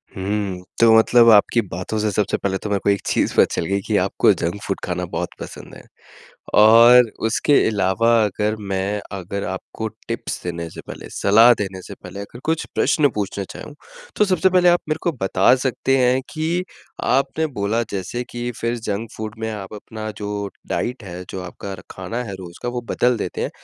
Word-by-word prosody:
हुँ। 95 -1 -3 0.2
तो 115 -1 +6
मतलब 115 +1 +6
आपकी 110 +3 +5
बातों 90 +5 -4
से 105 0 +1
सबसे 100 0 0
पहले 95 -1 -1
तो 105 - -6
मेरे 100 -1 +1
को - - +2
एक 100 - +2
चीज़ - - +1
पता - - +7
चल - - -1
गई 100 +2 0
कि - - 0
आपको - - +3
जंक 85 +5 -3
फ़ूड 95 - -3
खाना 90 0 -2
बहुत - - -2
पसंद - - -9
है। - - -13 0.8
और 115 +2 +8 0.2
उसके 130 +6 +1
अलावा 100 +1 +1
अगर 105 +1 -1 0.2
मैं 95 +2 -1 0.2
अगर 100 +2 -5
आपको 95 +4 -5 0.2
टिप्स - - -4
देने 85 -1 -4
से - - -10
पहले, - - -9
सलाह 115 +4 +5
देने 95 -3 -5
से - - -9
पहले 100 - -8
अगर 100 +4 -9
कुछ 160 0 0
प्रश्न 145 -4 +3
पूछना 100 -1 -2
चाहूँ, 150 - -10 0.4
तो 210 - +3
सबसे 190 -1 +3
पहले 180 -1 +5
आप 175 - +4
मेरे 155 - 0
को 170 - +2
बता 95 +4 +4
सकते 135 +1 +1
हैं 130 0 +3
कि 165 +3 -1 0.4
आपने 135 +5 +1
बोला 110 +4 +1
जैसे 100 +5 -3
कि 120 0 -4
फिर 115 +1 -1
जंक 110 0 -4
फ़ूड 110 +1 -5
में 110 0 -2
आप 105 -1 -7
अपना 110 +1 -7
जो 105 -1 -4 0.2
डाइट 125 -1 -3
है, 90 -1 -7
जो 95 - -5
आपका 95 +2 -7 0.2
खाना 115 +7 -5
है 100 -4 -6
रोज़ 85 -2 -10
का 120 - -1
वो 120 0 -4
बदल 125 -1 +2
देते - - -4
हैं। - - -2
105 Hz, 195 wpm, -21 LUFS, 95-120 Hz, 0.8 s, और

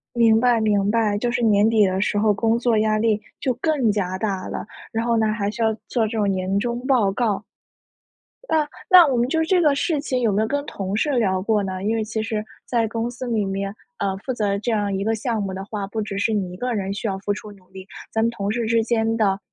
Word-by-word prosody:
明 230 -2 +5
白 240 -1 +3
明 205 -2 +2
白， 215 -2 +1
就 240 +4 -1
是 250 +1 -1
年 215 -1 +4
底 215 -3 +4
的 190 0 -1
时 210 - +1
候 210 0 +3
工 225 +2 +1
作 235 -1 +1
压 215 0 +2
力 215 -1 +1 0.2
就 255 - 0
更 265 -2 +1
加 185 -3 -1
大 195 -3 -2
了， - - -5 0.2
然 230 0 -2
后 235 -1 +2
呢， 220 -1 +2
还 205 -2 -1
需 230 - -4
要 220 0 +3 0.2
做 230 -3 +1
这 220 +1 -4
种 205 -2 +2
年 190 +1 0
终 240 +3 -3
报 245 -8 +3
告。 210 -2 -1 1.0
那 310 -2 +2 0.2
那 365 -3 +9
我 270 -3 +1
们 240 +1 +1
就 320 +4 +1
这 360 +2 +3
个 300 -4 +4
事 295 +1 0
情 260 -3 -1
有 225 -3 +2
没 205 +2 +2
有 220 - -1
跟 285 +2 -1
同 195 -4 -4
事 295 +7 +1
聊 190 -5 +1
过 210 +1 +1
呢？ 190 -1 -4
因 220 +2 +1
为 225 - 0
其 220 0 -3
实 220 -1 -3 0.2
在 235 -2 +1
公 230 +2 -2
司 250 +1 -7
里 225 -4 0
面， 195 +1 -3 0.2
呃， 195 -1 -1
负 255 +6 -4
责 205 -4 0
这 230 +3 -2
样 205 -2 0
一 195 +1 -2
个 225 +1 +1
项 220 0 -2
目 195 -1 -4
的 190 +1 -5
话， 205 -1 -4
不 220 +3 -4
只 200 -1 -4
是 210 +2 +1
你 195 -4 -1
一 - - -8
个 250 +4 -2
人 195 -2 -2
需 200 +3 -4
要 195 -2 -2
付 205 +1 -1
出 210 0 -8
努 190 -2 -20
力， 190 0 -10 0.3
咱 220 - 0
们 230 - +2
同 200 -3 -3
事 235 +1 -1
之 230 0 +2
间 225 0 0
的， 200 -3 +2
220 Hz, 280 characters per minute, -22 LUFS, 200-235 Hz, 1.0 s, 那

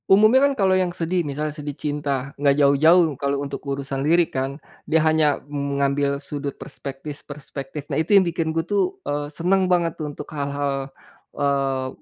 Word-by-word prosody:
Umumnya 215 +7 +6
kan - - -1
kalau 190 -3 +3
yang 185 -1 +2
sedih, 175 +1 -1
misalnya 150 0 -3
sedih 145 -2 -6
cinta, 140 -2 -2
nggak 140 -1 +4
jauh-jauh 155 +4 +5
kalau 140 0 0
untuk 140 - -6
urusan 135 0 -3
lirik 165 +4 +2
kan, 135 +1 -2 0.3
dia 160 - +4
hanya 155 -2 +3
mengambil 140 0 0
sudut 140 0 -5
perspektif-perspektif. 140 0 -8
Nah, 140 +3 +1
itu 185 +6 +4
yang 190 - +5
bikin 165 -1 -1
gue 160 0 -1
tuh, 205 - 0
eee, 145 0 -2
seneng 185 +4 +1
banget 170 -2 +2
untuk 150 -1 -5
hal-hal, 140 -1 -2 0.5
eee, 135 -2 0
145 Hz, 160 wpm, -23 LUFS, 140-165 Hz, 0.5 s, Umumnya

